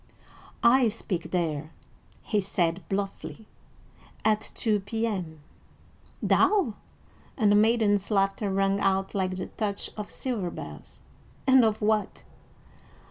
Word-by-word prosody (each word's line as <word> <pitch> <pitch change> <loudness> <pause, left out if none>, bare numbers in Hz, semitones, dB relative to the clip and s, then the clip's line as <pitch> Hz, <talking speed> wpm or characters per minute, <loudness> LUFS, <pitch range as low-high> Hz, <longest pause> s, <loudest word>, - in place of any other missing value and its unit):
"I 245 +1 +6
speak 205 -4 -3
there," 155 -4 -1 0.5
he 210 -2 0
said 175 -2 0
bluffly, 200 +2 -4 0.8
"at 215 0 +3
two 215 -3 +1
P.M." 195 -6 -3 0.8
"Thou!" 385 - +3 0.6
and 215 -5 +4
the - - +5
maiden's 210 -2 +3
laughter 195 0 +1
rang 195 +1 +1
out 195 0 +1
like 185 -2 -1
the 185 - -3
touch 205 -2 -3
of 210 -1 -6
silver 225 -9 -3
bells, - - -10 0.4
"and 260 -2 +6
of 220 -1 +1
what?" 215 -1 0
205 Hz, 115 wpm, -27 LUFS, 190-220 Hz, 0.8 s, I